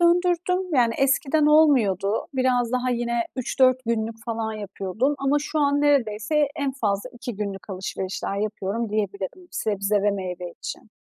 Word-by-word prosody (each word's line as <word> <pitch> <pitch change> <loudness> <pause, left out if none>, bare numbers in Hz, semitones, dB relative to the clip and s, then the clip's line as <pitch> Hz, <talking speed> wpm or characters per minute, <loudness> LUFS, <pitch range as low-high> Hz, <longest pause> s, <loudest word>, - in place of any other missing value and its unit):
döndürdüm. 355 +1 +2
Yani 235 -3 +3
eskiden 275 +2 +3
olmuyordu. 225 - +4
Biraz 255 -2 +1
daha 255 0 +1
yine 235 -1 0
3-4 255 0 +3
günlük 225 -1 -2
falan 225 -1 -2
yapıyordum 210 +5 -2
ama 275 +1 +2
şu 310 +1 -3
an 285 -1 +3
neredeyse 280 0 +2
en 280 -3 -1
fazla 215 -2 -1
2 245 -2 -7
günlük 200 -1 -5
alışverişler 190 +1 -4
yapıyorum 210 +1 -2
diyebilirim 205 - -3
sebze 205 - 0
ve 205 - +3
meyve 180 -3 -4
için. 220 - -7
235 Hz, 140 wpm, -24 LUFS, 205-280 Hz, -, olmuyordu